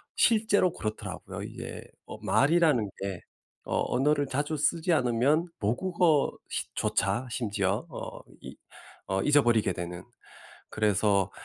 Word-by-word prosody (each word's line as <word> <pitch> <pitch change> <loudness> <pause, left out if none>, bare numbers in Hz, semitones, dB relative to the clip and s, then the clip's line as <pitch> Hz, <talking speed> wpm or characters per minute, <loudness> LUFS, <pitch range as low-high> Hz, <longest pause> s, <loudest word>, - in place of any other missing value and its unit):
실제로 215 -5 +3
그렇더라고요 105 -9 -6
이게. - - -7 0.2
어 - - -8
말이라는 145 -7 +3
게 95 -3 -4 0.5
어 - - +1
언어를 145 +3 +2
자주 145 +4 -1
쓰지 165 +4 +1
않으면 135 +5 +2
모국어 160 - +2 0.2
시 - - -3
조차 100 +6 0
심지어 105 - -1
어 135 - -7 0.2
이 - - -9 0.5
어 95 0 0
잊어버리게 120 -9 +3
되는. 90 0 -6 0.7
그래서 100 -2 +2
125 Hz, 260 characters per minute, -28 LUFS, 100-155 Hz, 0.7 s, 실제로